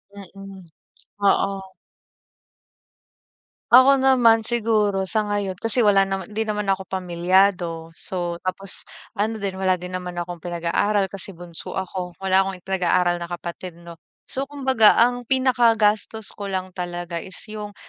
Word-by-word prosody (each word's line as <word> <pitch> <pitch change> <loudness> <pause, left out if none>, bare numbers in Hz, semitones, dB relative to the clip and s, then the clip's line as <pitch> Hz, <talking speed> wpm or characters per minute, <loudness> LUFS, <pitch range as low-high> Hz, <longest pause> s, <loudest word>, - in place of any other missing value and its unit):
Mm, 195 0 -11 0.7
oo. 195 0 +1 2.1
Ako 265 +2 +7
naman 245 -4 +5
siguro 215 -4 +1
sa 215 +1 0
ngayon 205 -2 -1
kasi 225 +1 +2
wala 200 -1 +5
naman, 195 +2 -4
'di 220 - -2
naman 210 -1 -2
ako 190 0 -2
pamilyado. 180 -2 +1
So, 175 -1 -5
tapos 185 +1 -4 0.3
ano 220 +1 -1
din 195 -2 -4
wala 185 -1 +2
din 180 0 -8
naman 180 -1 -5
akong 175 0 -5
pinag-aaral 175 +4 0
kasi 195 -1 -3
bunso 170 -1 -8
ako. 185 -1 -4
Wala 190 0 +4
akong 195 -1 -3
pinag-aaral 180 -2 +1
na 170 - -5
kapatid, 175 0 -7
'no? 170 -1 -12 0.3
So, 270 +1 -4
kumbaga 265 -6 +4
ang 245 +1 +3
pinakagastos 230 -5 +2
ko 200 -1 -6
lang 185 -1 -4
talaga 175 -1 -4
is 190 - -10
'yong, 210 -1 -8
195 Hz, 140 wpm, -22 LUFS, 180-215 Hz, 2.1 s, Ako